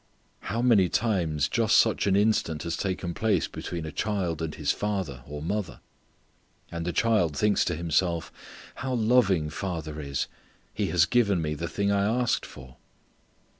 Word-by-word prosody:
How 115 +3 -3
many 105 -8 +5
times 85 -10 +1
just 115 -2 +3
such 110 -2 +3
an 95 - +3
instance 100 -7 +1
has 85 -1 -2
taken 90 -2 -3
place 100 -4 +1
between 85 -2 -6
a 80 - -5
child 90 -5 -2
and 80 -2 -3
his 75 -2 0
father, 95 -12 -3
or 75 +1 -6
mother. 100 +2 -3 0.9
And 85 0 -4
the - - +1
child 90 -6 +2
thinks 105 -1 +3
to 85 - -1
himself, 85 -1 0 0.5
"How 130 -2 -2
loving 110 -9 +3
father 80 -4 -4
is; 70 -1 -2 0.5
he - - -1
has 85 -2 +4
given 100 -4 +2
me 75 -2 -1
the 85 +3 -4
thing 100 +4 0
I 100 0 +2
asked 120 +3 +1
for." 65 -1 -13
90 Hz, 165 wpm, -27 LUFS, 80-105 Hz, 0.9 s, many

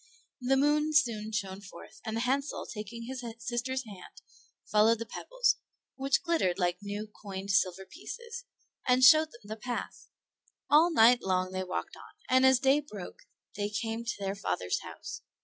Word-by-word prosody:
The 265 +2 +2
moon 300 +2 +2
soon 230 -7 +2
shone 195 -2 -3
forth, 200 - -13
and 220 -1 -3
Hansel, 270 +4 -1
taking 215 +2 -7
his 255 +1 -6
sister's 245 +2 -3
hand, 200 -4 -12 0.4
followed 215 +2 +4
the 230 - -5
pebbles, - - 0 0.4
which 270 +4 +1
glittered 325 - +1
like 180 -1 0
new 205 +1 -4
coined 200 -2 -6
silver 190 -1 +1
pieces, 475 - -8 0.4
and 255 0 +4
showed 310 +5 +9
them 235 -5 -16
the 215 +2 -7
path. 240 +2 -5 0.6
All 320 +4 +6
night 245 -3 +6
long 185 -1 0
they 185 0 -2
walked 185 0 -4
on, - - -14 0.2
and 260 +1 +6
as 260 -1 +6
day 270 +3 +4
broke 215 -11 -10 0.3
they 205 0 -2
came 225 +2 -3
to 235 - -3
their 195 -1 -2
father's 90 - -2
house. - - -8
230 Hz, 165 wpm, -30 LUFS, 200-265 Hz, 0.6 s, showed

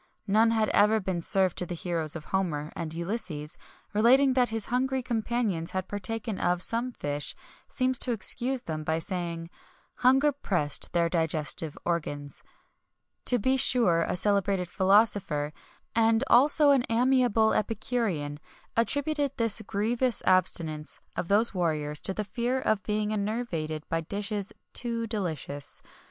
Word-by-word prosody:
None 220 +2 +3
had 220 -2 +1
ever 215 +2 +4
been 185 -3 -3
served 190 0 +3
to 180 - +1
the 175 - -4
heroes 165 -2 -2
of 155 -2 -7
Homer, 165 -6 -1
and 160 -2 -5
Ulysses, 170 -3 -3 0.4
relating 260 +6 +4
that 250 -1 +3
his 225 -1 -1
hungry 260 +1 0
companions 225 -7 -1
had 185 0 -3
partaken 210 +1 -3
of 180 0 +2
some 235 +2 0
fish, 145 -9 -4 0.3
seems 255 -1 0
to 250 - +1
excuse 245 +4 0
them, 155 -5 -5
by 160 +1 0
saying: 170 -1 -4 0.5
"Hunger 270 +4 +4
pressed 175 - 0
their 170 -1 +2
digestive 160 -2 -1
organs."[XXI 145 -4 -3
6] - - -21 0.8
To 245 - +3
be 260 +4 +1
sure 230 -10 +3
a - - -1
celebrated 200 -1 +1
philosopher,[XXI 190 -7 +2 0.4
7] 225 -1 +4
and 225 +2 +2
also 290 +3 +6
an 270 -3 +3
amiable 240 -2 +3
epicurean,[XXI 200 -9 -2 0.3
8] - - -14
attributed 285 +3 0
this 230 -2 +2
grievous 225 +3 0
abstinence 165 -4 +1 0.2
of 170 - -3
those 215 +5 +4
warriors 155 -5 0
to 190 - -3
the 215 - -2
fear 240 +4 -2
of 215 -5 0
being 210 0 -1
enervated 200 -8 -3
by 165 - -1
dishes 200 +3 -3 0.2
too 235 -1 +2
delicious. 160 - -4
205 Hz, 145 wpm, -27 LUFS, 165-235 Hz, 0.8 s, also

